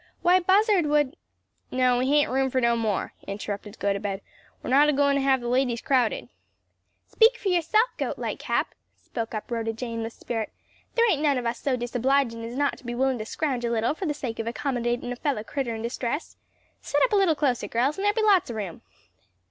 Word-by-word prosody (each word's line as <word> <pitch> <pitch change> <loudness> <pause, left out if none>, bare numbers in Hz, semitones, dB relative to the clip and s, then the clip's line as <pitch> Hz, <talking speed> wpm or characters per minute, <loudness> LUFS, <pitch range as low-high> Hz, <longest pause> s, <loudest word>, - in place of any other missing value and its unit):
"Why, 360 +1 +5
Buzzard 385 -1 +3
would 295 -1 +2 0.3
" - - -46
"No, 255 -1 +3
we 255 - +1
hain't 290 0 +3
room 265 +1 +1
for 260 - +1
no 235 -1 +3
more?" 220 -4 -1
interrupted 205 +1 -5
Gotobed. 200 0 -2 0.4
"We're - - -4
not 290 +3 +6
agoin' 285 -1 +3
to 280 - +1
have 270 -1 +3
the 240 - -4
ladies 250 -1 +1
crowded." 250 -4 +1 0.8
"Speak 470 +2 +4
fur 405 - -2
yerself, 375 +6 +3
Gote - - -2
Lightcap," - - -1 0.3
spoke 230 -2 -5
up 215 - -6
Rhoda 225 -1 -1
Jane 230 0 -4
with 225 0 -5
spirit. 225 -3 -4 0.4
"There 470 0 +4
ain't 295 - 0
none 290 -3 +3
of 245 - -3
us 235 +1 -2
so 265 -3 0
disobligin' 245 0 0
as 235 +2 -6
not 285 0 0
to - - -19
be 240 -1 -4
willin' 260 0 +1
to 215 - -4
scrouge 265 -5 -2
a 235 - 0
little 230 +2 +1
for 360 +3 -4
the 295 - -1
sake 235 -6 -5
of 225 - -3
accommodatin' 245 -1 -2
a - - -3
fellow 250 -4 -2
critter 245 -1 -3
in 220 - -6
distress. 240 +5 -3 0.5
Set - - +1
up - - +2
a - - +5
little 385 -5 +4
closer, 265 -5 0
girls, 260 +8 0
and - - -2
there'll 410 - +3
be 445 - +1
lots 395 -8 +4
o' 235 - -4
room." 195 -6 -5
255 Hz, 215 wpm, -26 LUFS, 230-295 Hz, 0.8 s, not